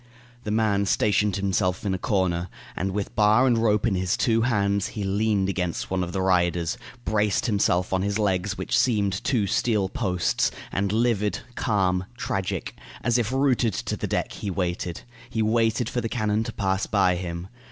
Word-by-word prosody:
The - - -3
man 105 -2 +1
stationed 105 -1 +2
himself 95 -1 0
in 95 - +1
a 95 - -2
corner, 90 -3 0 0.3
and, 95 - -1
with 100 +1 -3
bar 110 +4 +5
and 125 -2 +4
rope 110 -2 +2
in 115 - +2
his 90 -1 0
two 115 -1 +2
hands, 100 -4 +1
he 105 - -2
leaned 100 0 +1
against 90 -3 -2
one 95 -1 0
of 90 - -4
the 95 0 -1
riders, 85 -2 +1 0.3
braced 105 -1 +1
himself 95 -4 +1
on 95 - +2
his 100 +1 0
legs, 95 -1 0
which - - -1
seemed 100 -6 +1
two 120 -7 +1
steel 100 0 +1
posts; 90 -5 0 0.2
and 95 +1 0
livid, 105 -3 +1
calm, 95 -6 0
tragic, 95 -6 -3 0.3
as 120 0 +2
if 115 -1 -1
rooted 130 -6 +2
to - - -3
the - - -4
deck, - - -1
he 100 - -5
waited. 90 -2 -2 0.3
He 110 - 0
waited 115 +1 +1
for 120 - -2
the 115 - -3
cannon 110 -2 0
to - - -4
pass 95 -1 -1
by 95 -3 +3
him. 85 0 -5
100 Hz, 185 wpm, -25 LUFS, 95-110 Hz, 0.3 s, bar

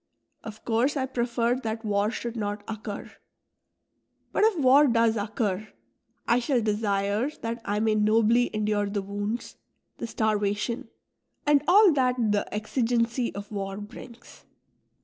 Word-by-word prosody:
Of 220 -1 -10
course 245 +6 +1
I 265 - 0
prefer 240 -1 0
that 225 -2 -4
war 205 0 +1
should 235 0 -5
not 205 -2 -3
occur; 215 -2 -6 1.2
but - - +1
if 435 -4 +3
war 280 +1 +6
does 230 -2 +3
occur, 210 -1 -2 0.6
I 235 - +4
shall 250 +1 +1
desire 210 +2 0
that 230 +1 -3
I 205 +1 -1
may 220 -1 +2
nobly 220 +3 +3
endure 210 -1 0
the 200 -1 -2
wounds, 205 +4 -4 0.4
the - - -3
starvation, 215 +1 -1 0.6
and 290 -1 +4
all 395 +2 +7
that 255 -3 +2 0.2
the 205 -1 -1
exigency 230 +2 0
of 205 +1 -7
war 195 -1 -4
brings. 230 +3 -11
225 Hz, 135 wpm, -26 LUFS, 210-240 Hz, 1.2 s, all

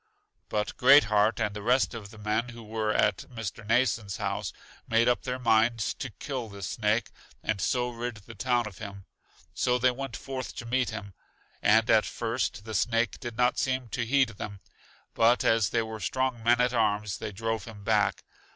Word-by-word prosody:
But 105 0 -2
Great 140 +3 +8
heart 105 +1 +2
and 105 - 0
the 105 - -5
rest 125 +5 +2
of 110 -4 -7
the 110 - -14
men 105 +3 -1
who 120 -1 -10
were 110 0 -1
at - - +3
Mr. 115 -3 -6
Mnason's 110 -3 +1
house, - - -2 0.4
made 115 +1 +3
up 125 - +3
their 125 -1 -3
minds 115 -2 +2
to 130 - -6
kill 125 +2 -5
this 100 -2 -7
snake, 105 +4 0 0.3
and 110 -3 -1
so 125 +3 0
rid 120 0 -4
the 105 +3 -12
town 120 +2 +1
of 105 -5 -9
him. 100 -2 -8 0.5
So 125 +6 +1
they 125 +1 +3
went 130 -2 -5
forth 130 -2 -6
to 120 - -6
meet 125 +1 +1
him, 100 -3 -7 0.5
and 110 +2 +4
at 110 -3 +4
first 115 -2 -2
the 110 - -6
snake 115 +2 +1
did 120 -3 -6
not 125 0 +2
seem 130 -2 -1
to 120 - -2
heed 130 +1 +3
them; 100 -2 -7 0.5
but 115 +2 +4
as 115 -4 +3
they 115 - +1
were 110 0 -6
strong 130 +4 -1
men 120 +2 +4
at 125 0 +2
arms, 105 -3 0
they - - -4
drove 115 0 -3
him 105 -3 -10
back. 105 -1 +1
115 Hz, 195 wpm, -28 LUFS, 105-125 Hz, 0.5 s, Great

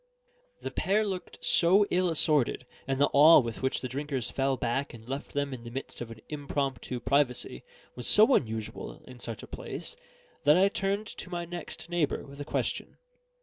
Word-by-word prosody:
The - - -4
pair 210 +3 +1
looked 185 -3 -5
so 190 +4 +5
ill 180 0 +2
assorted, 150 -6 +2 0.2
and 135 0 -1
the 145 - +3
awe 155 +4 +9
with 115 -4 -4
which 130 +1 -1
the 130 - -3
drinkers 135 -2 -3
fell 135 0 0
back 125 +3 -2
and 115 0 -14
left 135 +2 -5
them 140 -1 -1
in 120 -2 -8
the 115 - -7
midst 130 +1 -7
of 120 - -5
an 115 -1 -11
impromptu 140 -3 -3
privacy 125 - 0 0.3
was 125 - -3
so 220 +6 +7
unusual 110 - -2
in 125 -1 -12
such 115 -2 -6
a - - -9
place, 475 - -6 0.5
that 150 +3 +6
I 195 +2 +5
turned 200 +2 -1
to 190 - -9
my 175 -1 -3
next 175 -1 -7
neighbour 170 -4 -1
with 140 +1 -10
a - - -5
question. - - -3
140 Hz, 190 wpm, -29 LUFS, 125-175 Hz, 0.5 s, awe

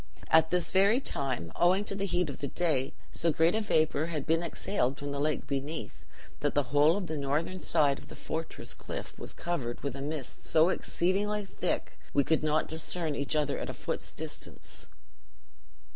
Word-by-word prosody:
At 160 0 +6
this 180 -2 +1
very 200 +6 +5
time, 130 - -1
owing 185 +4 +4
to - - -3
the 200 0 -1
heat 175 -4 +1
of - - -9
the 140 - -2
day, 145 -4 0 0.2
so 165 - +1
great 160 +3 +3
a 220 - +1
vapor 160 -6 +2
had 155 -5 -3
been 165 +1 +2
exhaled 160 -5 -1
from 145 0 -4
the 140 - -2
lake 150 +1 0
beneath 140 +3 -4 0.3
that - - 0
the 145 - +4
whole 150 +5 +6
of 200 - -2
the 155 -3 -3
northern 150 +7 -1
side 150 -5 +2
of - - -14
the - - -10
fortress 160 +1 -4
cliff - - -6
was - - -6
covered 135 -9 -3
with 140 - -2
a 135 - -5
mist 145 -2 -5
so 160 +2 +5
exceedingly 200 +4 0
thick - - -3 0.2
we 140 - +5
could 160 +3 +2
not 155 0 +2
discern 160 0 -1
each 140 +2 -2
other 150 -2 +1
at - - -4
a - - -3
foot's - - -3
distance. - - -8
160 Hz, 190 wpm, -30 LUFS, 145-175 Hz, 0.3 s, At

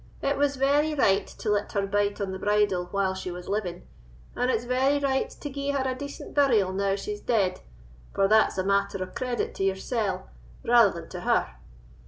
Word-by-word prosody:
It 280 +1 +1
was 285 0 +1
very 290 +3 +2
right 200 -8 +3
to 215 - -4
let 205 0 -1
her 200 -1 0
bite 205 0 0
on 195 -2 -2
the 190 - -5
bridle 205 -3 +1
when 195 0 0
she 190 -1 -5
was 180 0 -7
living, 190 -4 -3 0.5
and 250 +1 0
it's 230 -2 +1
very 260 +3 +2
right 275 -2 0
to - - -8
gie 280 0 -4
her 275 -2 0
a 260 - 0
decent 280 +2 -8
burial 230 -10 +3
now 195 0 +1
she's 415 - -5
dead, 200 -6 +1 0.5
for 195 - +2
that's 215 0 +4
a 185 - +1
matter 200 0 0
o' 185 - -10
credit 250 -1 -2
to - - -3
yoursell 195 0 -1 0.4
rather 235 -3 +6
than - - -14
to - - -5
her. - - +1
210 Hz, 200 wpm, -26 LUFS, 195-265 Hz, 0.5 s, rather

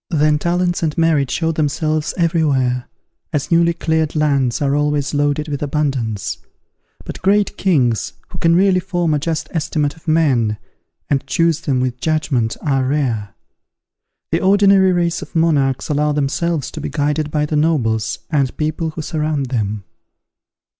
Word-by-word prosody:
Then 150 -3 +2
talents 175 +2 0
and 155 -3 -1
merit 160 -5 +2
showed 165 -1 0
themselves 155 0 -1
every 165 -1 +2
where, 125 -4 0 0.4
as 150 +2 -2
newly 170 0 +4
cleared 160 -1 -1
lands 140 -5 +1
are 140 -1 +1
always 145 0 0
loaded 145 +1 0
with 145 -2 -4
abundance. 135 - -2 0.7
But - - -7
great 205 +2 +2
kings, 130 - +1 0.2
who - - -8
can 165 0 +3
really 190 0 +4
form 175 -3 -1
a 150 - +1
just 160 +1 -2
estimate 155 -3 -1
of 160 - -21
men, 130 -10 +2 0.5
and 140 -2 -1
choose 165 -1 +1
them 135 -5 0
with 125 -1 -2
judgment, 140 -8 0
are 135 -3 +1
rare. 120 - -1 1.0
The 165 - +1
ordinary 195 -1 +5
race 175 -1 0
of - - -11
monarchs 145 -6 +1
allow 150 0 +1
themselves 150 +1 -1
to - - -7
be - - -4
guided 150 +1 -1
by 150 0 0
the 150 - -2
nobles 115 -8 +1
and 140 -4 0
people 155 +1 -1
who 160 0 -6
surround 150 -4 -2
them. 105 -4 -2
150 Hz, 155 wpm, -18 LUFS, 135-165 Hz, 1.0 s, ordinary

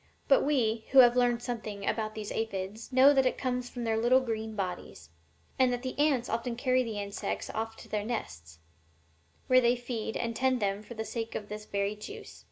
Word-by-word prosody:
But 275 - +5
we, 230 -6 +1
who - - +4
have 245 -1 +6
learned 240 -1 +2
something 215 -5 -5
about 215 -1 -1
these 215 -1 -5
aphides, 215 +1 -4
know 265 +3 +7
that 265 -2 +4
it - - -1
comes 250 -1 -2
from 245 - -6
their 225 -1 0
little 245 +3 +5
green 220 -3 -4
bodies, 190 -3 -5 0.5
and 255 -1 +4
that 245 0 -3
the 255 - -3
ants 280 -5 +2
often 235 +1 -2
carry 255 +1 +2
the 225 -4 -4
insects 200 0 -4
off 225 0 -4
to - - -12
their 210 -1 -2
nests, 80 - -5 0.9
where 255 0 +5
they 240 0 +3
feed 240 -3 -4
and 230 -1 -3
'tend 260 0 +1
them 200 -1 -1
for 235 +3 -10
the 220 0 -4
sake 225 -1 -4
of 210 - -5
this 210 0 -6
very 200 0 -1
juice. 210 - -10
230 Hz, 205 wpm, -30 LUFS, 215-250 Hz, 0.9 s, know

